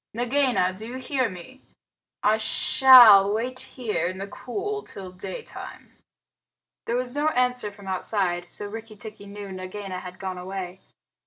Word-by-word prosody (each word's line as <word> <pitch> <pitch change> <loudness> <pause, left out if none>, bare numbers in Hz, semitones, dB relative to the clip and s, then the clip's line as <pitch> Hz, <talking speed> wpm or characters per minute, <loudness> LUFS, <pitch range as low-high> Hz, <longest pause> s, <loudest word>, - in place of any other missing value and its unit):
Nagaina 245 -6 +1
do 215 +4 -8
you 250 +2 -6
hear 260 -2 -1
me? 200 +9 -12 0.6
I 215 +1 +4
shall 225 -3 +7
wait 245 +4 -2
here 215 -9 -3
in 185 +1 -5
the 195 - -5
cool 400 - -5
till 190 - -9
daytime." 185 +1 -9 0.9
There 235 - -1
was 250 0 -2
no 295 +2 0
answer 250 -6 +1
from 200 -1 -14
outside, 185 -2 -1
so 205 - -5
Rikki 220 +1 -8
tikki 210 -1 -11
knew 200 -1 -8
Nagaina 185 0 -6
had 180 0 -10
gone 185 -1 -5
away. 185 0 -6
210 Hz, 150 wpm, -25 LUFS, 190-250 Hz, 0.9 s, shall